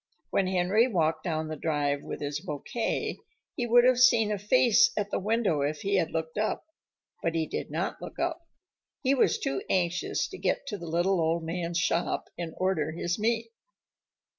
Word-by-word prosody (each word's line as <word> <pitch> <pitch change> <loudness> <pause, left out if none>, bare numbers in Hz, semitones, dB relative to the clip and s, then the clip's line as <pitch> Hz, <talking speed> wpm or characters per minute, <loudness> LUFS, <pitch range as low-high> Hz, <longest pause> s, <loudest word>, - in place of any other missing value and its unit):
When 195 - +2
Henry 190 +6 +3
walked 165 -8 0
down 160 -2 -1
the 155 - -4
drive 145 -2 -1
with - - -7
his 145 0 -2
"bouquet," 150 - -3 0.4
he 245 -5 -2
would 240 +1 +6
have 250 0 +4
seen 235 -4 +5
a 205 - -1
face 230 +1 +5
at 205 -1 -1
the - - 0
window 205 -7 +1
if 145 +1 -1
he 200 0 +1
had 165 -3 +1
looked 160 +3 -3
up. 215 - -1 0.6
But 165 0 -1
he 160 -1 +1
did - - -4
not - - -3
look - - -8
up. 335 0 -2 0.6
He 265 0 +3
was 270 - +3
too 135 -1 -2
anxious 180 -1 0
to - - -9
get - - 0
to 205 - -4
the 170 - -7
little 175 +3 +1
old 165 +1 +1
man's 170 +1 -3
shop 165 +1 0
and 170 -2 -6
order 160 -5 0
his 175 +3 -2
meat. 230 +1 0
180 Hz, 190 wpm, -28 LUFS, 160-225 Hz, 0.6 s, would